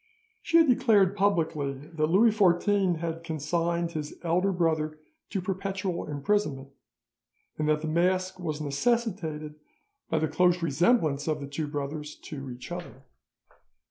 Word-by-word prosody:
She 335 Hz, -, +3 dB
had 330 Hz, -, +7 dB
declared 210 Hz, -6 st, +4 dB
publicly 165 Hz, -8 st, +1 dB
that 155 Hz, +3 st, -3 dB
Louis 205 Hz, +8 st, +5 dB
XIV 195 Hz, -2 st, +3 dB
had 165 Hz, 0 st, -4 dB
consigned 170 Hz, +2 st, -1 dB
his 155 Hz, -3 st, -5 dB
elder 180 Hz, +3 st, +2 dB
brother 160 Hz, -3 st, 0 dB, 0.3 s
to 195 Hz, -, -2 dB
perpetual 190 Hz, -1 st, -3 dB
imprisonment, 145 Hz, -2 st, -1 dB, 0.9 s
and 155 Hz, 0 st, +1 dB
that 155 Hz, 0 st, +2 dB
the -, -, -2 dB
mask 185 Hz, +3 st, +1 dB
was 155 Hz, -4 st, -3 dB
necessitated 155 Hz, -, -1 dB, 0.5 s
by 160 Hz, -, +1 dB
the 155 Hz, 0 st, +1 dB
close 180 Hz, +1 st, +2 dB
resemblance 160 Hz, -, +2 dB
of 155 Hz, -1 st, 0 dB
the 140 Hz, -, -5 dB
two 145 Hz, +2 st, -4 dB
brothers 150 Hz, +1 st, -5 dB
to 140 Hz, -3 st, -8 dB
each 125 Hz, +6 st, -9 dB
other. 175 Hz, -7 st, -7 dB
165 Hz, 140 wpm, -28 LUFS, 150-185 Hz, 0.9 s, had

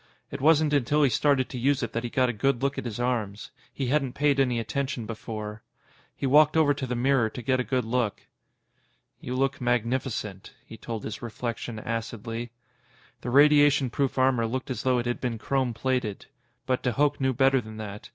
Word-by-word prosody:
It 140 Hz, -, -6 dB
wasn't 155 Hz, 0 st, +4 dB
until 145 Hz, +2 st, +2 dB
he 135 Hz, -, +3 dB
started 135 Hz, +1 st, +2 dB
to 125 Hz, -, -5 dB
use 135 Hz, +1 st, +1 dB
it 115 Hz, -, -4 dB
that 115 Hz, -, -2 dB
he 120 Hz, -, -3 dB
got 130 Hz, +1 st, +2 dB
a 125 Hz, -, -1 dB
good 135 Hz, +3 st, 0 dB
look 140 Hz, 0 st, 0 dB
at -, -, -7 dB
his 115 Hz, -1 st, -5 dB
arms. 115 Hz, -5 st, -2 dB, 0.2 s
He 135 Hz, -, -3 dB
hadn't 135 Hz, -1 st, 0 dB
paid 145 Hz, -1 st, +2 dB
any 125 Hz, -3 st, +2 dB
attention 125 Hz, +2 st, -3 dB
before. 110 Hz, -1 st, -6 dB, 0.5 s
He -, -, -4 dB
walked 150 Hz, +3 st, +5 dB
over 150 Hz, -2 st, +4 dB
to 135 Hz, -2 st, -5 dB
the 125 Hz, -, -2 dB
mirror 125 Hz, -2 st, +2 dB
to 125 Hz, -, -8 dB
get 130 Hz, 0 st, +1 dB
a -, -, +1 dB
good 125 Hz, -2 st, -1 dB
look. 115 Hz, -2 st, -1 dB, 1.0 s
"You 125 Hz, -, -5 dB
look 135 Hz, +1 st, 0 dB
magnificent," 120 Hz, -4 st, -2 dB
he -, -, -10 dB
told 110 Hz, -1 st, -6 dB
his 110 Hz, -, -6 dB
reflection 120 Hz, 0 st, -5 dB
acidly. 115 Hz, +1 st, -4 dB, 0.7 s
The 125 Hz, -, -4 dB
radiation 145 Hz, -1 st, +5 dB
proof 135 Hz, 0 st, -1 dB
armor 130 Hz, -3 st, +3 dB
looked 130 Hz, +3 st, -4 dB
as 130 Hz, -, -3 dB
though 130 Hz, -1 st, +2 dB
it 120 Hz, -, -1 dB
had 120 Hz, 0 st, -2 dB
been 120 Hz, -2 st, -2 dB
chrome 130 Hz, +2 st, 0 dB
plated. 120 Hz, -3 st, -2 dB, 0.4 s
But 130 Hz, -1 st, 0 dB
de 125 Hz, -, 0 dB
Hooch 145 Hz, +3 st, +1 dB
knew 130 Hz, -1 st, +2 dB
better 135 Hz, 0 st, +4 dB
than 110 Hz, -1 st, -10 dB
that. 105 Hz, -1 st, -8 dB
125 Hz, 200 wpm, -26 LUFS, 115-135 Hz, 1.0 s, walked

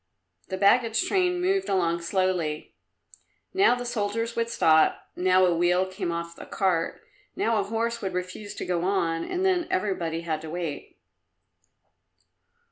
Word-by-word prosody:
The 190 Hz, -, -4 dB
baggage 225 Hz, -, +3 dB
train 360 Hz, -2 st, +1 dB
moved 385 Hz, +2 st, 0 dB
along 170 Hz, -2 st, +1 dB
slowly; 170 Hz, -4 st, -1 dB, 0.8 s
now 380 Hz, -10 st, +4 dB
the 245 Hz, 0 st, -5 dB
soldiers 230 Hz, 0 st, -2 dB
would 230 Hz, 0 st, -1 dB
stop, 160 Hz, -9 st, +3 dB
now 185 Hz, +1 st, +4 dB
a 175 Hz, -1 st, +2 dB
wheel 175 Hz, +2 st, +2 dB
came 185 Hz, -2 st, -4 dB
off 170 Hz, 0 st, -5 dB
a -, -, -9 dB
cart, 180 Hz, -4 st, 0 dB, 0.3 s
now 230 Hz, -, +1 dB
a 205 Hz, -, +1 dB
horse 230 Hz, +2 st, -2 dB
would 190 Hz, -2 st, -3 dB
refuse 180 Hz, +3 st, -5 dB
to -, -, -5 dB
go 175 Hz, -1 st, -1 dB
on, 170 Hz, -4 st, 0 dB
and 365 Hz, +1 st, -2 dB
then 360 Hz, -3 st, +2 dB
everybody 175 Hz, -4 st, -1 dB
had 160 Hz, -2 st, -3 dB
to 160 Hz, -, -8 dB
wait. 165 Hz, -3 st, -5 dB
190 Hz, 150 wpm, -26 LUFS, 170-230 Hz, 0.8 s, now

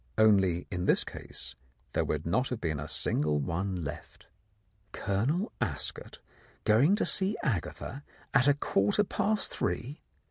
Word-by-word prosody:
Only 95 Hz, -5 st, +4 dB
in 90 Hz, -1 st, -2 dB
this -, -, +4 dB
case 65 Hz, -, -8 dB, 0.4 s
there -, -, +2 dB
would 75 Hz, +1 st, -2 dB
not 125 Hz, +10 st, +1 dB
have 125 Hz, -, -3 dB
been 80 Hz, -7 st, -2 dB
a 75 Hz, -, -5 dB
single 75 Hz, -1 st, +1 dB
one 90 Hz, +5 st, -2 dB
left. 70 Hz, -, -8 dB, 0.7 s
Colonel 125 Hz, -, 0 dB
Ascot -, -, -3 dB, 0.5 s
going 125 Hz, -, +5 dB
to 210 Hz, -, +1 dB
see 195 Hz, +2 st, +1 dB
Agatha 130 Hz, -, -3 dB, 0.3 s
at 135 Hz, -1 st, +5 dB
a 145 Hz, -, +5 dB
quarter 105 Hz, -, +2 dB
past 210 Hz, +1 st, 0 dB
three... 140 Hz, +6 st, -3 dB
105 Hz, 140 wpm, -30 LUFS, 85-140 Hz, 0.7 s, going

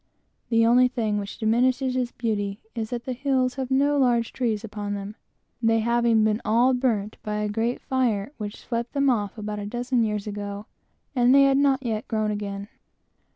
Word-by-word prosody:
The 230 Hz, -1 st, +4 dB
only 250 Hz, +2 st, +5 dB
thing 220 Hz, -4 st, -1 dB
which 200 Hz, -1 st, -6 dB
diminishes 250 Hz, +3 st, +1 dB
its 250 Hz, -1 st, -1 dB
beauty 205 Hz, -3 st, -2 dB
is, 225 Hz, -2 st, -4 dB
that 240 Hz, 0 st, -4 dB
the 255 Hz, -, -2 dB
hills 260 Hz, -1 st, 0 dB
have 265 Hz, -2 st, -4 dB
no 285 Hz, +2 st, +2 dB
large 240 Hz, -3 st, +2 dB
trees 225 Hz, -4 st, -1 dB
upon 205 Hz, -1 st, -4 dB
them, 200 Hz, +1 st, -6 dB, 0.5 s
they 225 Hz, -1 st, +3 dB
having 235 Hz, -1 st, +3 dB
been 215 Hz, +1 st, +1 dB
all 240 Hz, +4 st, +3 dB
burnt 225 Hz, -5 st, 0 dB
by 210 Hz, 0 st, -3 dB
a 210 Hz, 0 st, -1 dB
great 225 Hz, +4 st, -1 dB
fire 240 Hz, -4 st, 0 dB
which 205 Hz, 0 st, -5 dB
swept 235 Hz, 0 st, -4 dB
them 280 Hz, -2 st, +3 dB
off 205 Hz, -3 st, -2 dB
about 210 Hz, -1 st, -4 dB
a 205 Hz, -, -5 dB
dozen 245 Hz, +2 st, 0 dB
years 210 Hz, -2 st, -2 dB
before, 205 Hz, 0 st, -5 dB, 0.5 s
and 250 Hz, +1 st, +5 dB
they 275 Hz, -, +7 dB
had 275 Hz, 0 st, +4 dB
not 275 Hz, -1 st, +2 dB
yet 220 Hz, -2 st, -2 dB
grown 215 Hz, -2 st, 0 dB
up 210 Hz, -, -2 dB
again. 200 Hz, -1 st, -5 dB
230 Hz, 195 wpm, -25 LUFS, 210-255 Hz, 0.5 s, they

